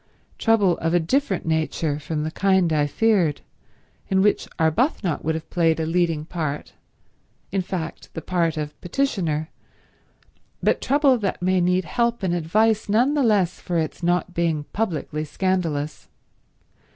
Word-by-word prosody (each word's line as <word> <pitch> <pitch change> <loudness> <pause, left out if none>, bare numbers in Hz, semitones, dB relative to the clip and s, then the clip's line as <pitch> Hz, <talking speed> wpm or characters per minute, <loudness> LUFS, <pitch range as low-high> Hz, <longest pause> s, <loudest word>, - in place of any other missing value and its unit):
Trouble 205 -6 +3
of 165 +1 0
a - - +5
different 195 - 0
nature 160 -2 -1
from 150 0 -3
the 155 - -3
kind 190 -3 +2
I 145 -1 +2
feared, 185 -4 +2 0.7
in 190 0 +3
which 210 - +2
Arbuthnot 170 - +1
would 160 +1 0
have 160 0 -6
played 165 -2 +2
a 160 - 0
leading 165 -2 0
part, 155 -4 -4 0.8
in 195 0 0
fact 175 -3 -5
the 165 - -4
part 170 -3 0
of 150 -1 -3
petitioner, 175 - -1 1.1
but - - +2
trouble 275 -2 +3
that 200 -3 -2
may 185 0 +2
need 180 +1 +2
help 235 +2 0
and 180 -2 +1
advice 210 +6 +1
none 240 +7 +3
the 295 - +1
less 205 -8 +2
for 175 - -2
its 160 +1 -2
not 175 +1 0
being 165 -3 0
publicly 155 -7 -2
scandalous. 155 -3 -2
175 Hz, 150 wpm, -23 LUFS, 160-200 Hz, 1.1 s, a